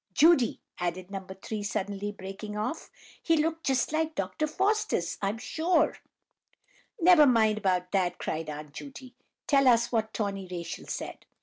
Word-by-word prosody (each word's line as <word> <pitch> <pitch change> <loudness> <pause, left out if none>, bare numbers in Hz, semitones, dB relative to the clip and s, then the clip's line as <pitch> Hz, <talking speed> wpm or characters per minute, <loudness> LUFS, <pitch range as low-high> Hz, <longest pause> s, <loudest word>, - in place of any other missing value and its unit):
"Judy!" 295 -2 +5 0.2
added 180 +2 -3
No. 195 - -3
3, 190 +3 -7
breaking - - -5
suddenly 205 0 -3 0.4
off; 220 +9 -3 0.3
"he 330 -1 +2
looked 325 +2 0
just 265 -1 +1
like 315 0 0
Dr. 310 - -1
Faustus, 410 +7 0
I'm 200 +2 -1
sure!" 320 +6 +1 1.0
"Never 340 -4 +7
mind 220 -4 +3
about 180 -3 0
that," 185 -3 +1
cried 160 0 -3
Aunt 150 -1 -7
Judy. 265 - -10 0.3
"Tell 275 -2 +4
us 235 -1 +4
what 220 -2 0
Tawny 200 -3 -3
Rachel 175 -2 -6
said." - - -6
220 Hz, 145 wpm, -28 LUFS, 190-305 Hz, 1.0 s, Never